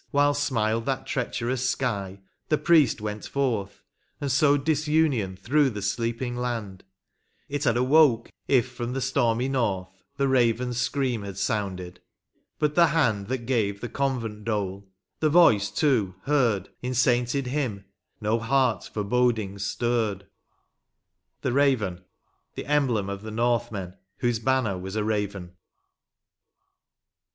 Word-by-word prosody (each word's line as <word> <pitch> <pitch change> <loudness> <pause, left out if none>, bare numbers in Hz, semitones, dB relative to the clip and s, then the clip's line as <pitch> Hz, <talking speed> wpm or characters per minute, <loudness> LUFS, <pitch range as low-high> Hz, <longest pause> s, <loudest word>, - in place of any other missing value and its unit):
Wliile 145 0 +4
smiled 115 -5 0
that 135 -1 -1
treacherous 125 0 -1
sky 100 -8 -2 0.3
the 155 - +3
priest 160 -9 +3
went 105 0 -5
forth 115 -8 -2 0.4
And 140 -1 -2
sowed 145 0 +3
disunion 150 -10 +1
through 145 +6 +2
the 105 -4 -6
sleeping 115 +4 -2
land; 115 -6 -4 0.6
It 145 +1 -3
had 120 -2 +3
awoke 130 -1 +4 0.2
if 130 -3 +3
from 120 0 -4
the 135 - -2
stormy 120 -2 +1
north 105 -9 -1 0.3
The 140 - +2
raven's* 125 -1 +1
scream 130 -6 -1
had 100 -2 -7
sounded 95 -3 -3 0.3
— - - -46
but 150 -1 +1
the 170 +1 +5
hand 125 -11 +1
That 125 -1 -3
gave 110 -5 0
the 120 - -5
convent 120 -5 -2
dole 100 -3 -3
— - - -56
the 155 - +2
voice, 130 - +5
too, 115 - +1
heard 120 -9 +1
In 125 +1 -3
sainted 120 +2 +2
hymn, 125 -7 -2 0.3
no 110 +2 0
heart 120 -3 +1
forebodings 105 -2 0
stirred. 110 -4 -1 0.6
* - - -53
The 125 -9 +1 0.6
emblem 130 -8 +1
of 100 0 -5
the 110 - -7
Northmen, 115 -5 -1 0.2
whose 120 -2 0
banner 115 -6 0
was 95 +2 -6
a 110 - 0
raven. 100 -4 -3
120 Hz, 135 wpm, -26 LUFS, 105-135 Hz, 0.6 s, the